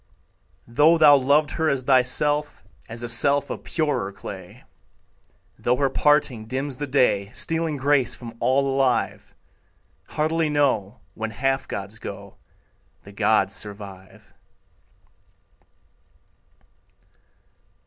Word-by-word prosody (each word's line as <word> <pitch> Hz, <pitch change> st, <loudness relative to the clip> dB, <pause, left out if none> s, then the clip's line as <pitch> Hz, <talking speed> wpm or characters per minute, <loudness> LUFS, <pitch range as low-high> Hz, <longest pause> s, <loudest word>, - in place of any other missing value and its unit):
Though 150 Hz, +8 st, +4 dB
thou 150 Hz, -2 st, +7 dB
loved 145 Hz, +2 st, +2 dB
her 160 Hz, -1 st, 0 dB
as 135 Hz, -3 st, -1 dB
thyself, 140 Hz, +3 st, +1 dB, 0.3 s
As 115 Hz, +1 st, -7 dB
a -, -, -3 dB
self 140 Hz, +4 st, +3 dB
of -, -, -7 dB
purer 150 Hz, -11 st, -2 dB
clay, 95 Hz, -, -10 dB, 1.0 s
Though 125 Hz, -, +1 dB
her 135 Hz, 0 st, 0 dB
parting 135 Hz, -7 st, +1 dB
dims 130 Hz, +2 st, -4 dB
the 145 Hz, -, -4 dB
day, 105 Hz, -7 st, +1 dB
Stealing 160 Hz, 0 st, 0 dB
grace 140 Hz, -1 st, +1 dB
from 115 Hz, -2 st, -10 dB
all 140 Hz, +2 st, +1 dB
alive; 135 Hz, -4 st, -1 dB, 0.7 s
Heartily 160 Hz, +1 st, -1 dB
know, 125 Hz, -7 st, 0 dB
When 110 Hz, +1 st, -5 dB
half 135 Hz, +4 st, -2 dB
gods 100 Hz, +2 st, -6 dB
go, -, -, -9 dB, 0.7 s
The 100 Hz, -, -13 dB
gods 100 Hz, -1 st, +1 dB
survive. 100 Hz, -3 st, -7 dB
130 Hz, 105 wpm, -23 LUFS, 110-145 Hz, 1.0 s, thou